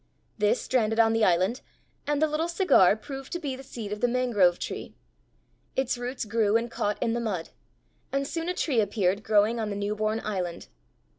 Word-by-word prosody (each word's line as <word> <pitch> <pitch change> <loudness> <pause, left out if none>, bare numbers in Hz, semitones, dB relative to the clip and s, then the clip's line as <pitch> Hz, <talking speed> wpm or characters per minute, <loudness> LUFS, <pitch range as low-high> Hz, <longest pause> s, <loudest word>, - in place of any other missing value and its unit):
This 210 +3 +3
stranded 225 -3 0
on 225 0 +5
the 225 -1 +2
island, 185 +6 +2 0.5
and 295 -1 +1
the 315 - +4
little 310 +2 -1
cigar 340 - +4
proved 270 +4 -8
to 345 - -2
be 285 -6 -3
the 260 - -9
seed 230 -6 -7
of 210 - -4
the 245 - +4
mangrove 235 -8 +3
tree; - - -6 0.8
its 265 -1 0
roots 245 0 -4
grew 215 0 +2
and 235 0 -4
caught 205 -2 -1
in 225 - 0
the 240 - -1
mud, 200 -8 -3 0.6
and 275 0 -1
soon 330 +2 -3
a 360 - -1
tree 270 -10 +1
appeared 200 -1 0
growing 215 +2 +2
on 220 -2 -2
the 200 - -3
new 205 +1 -2
born 215 +1 0
island. 180 -5 -4
225 Hz, 200 wpm, -27 LUFS, 205-260 Hz, 0.8 s, on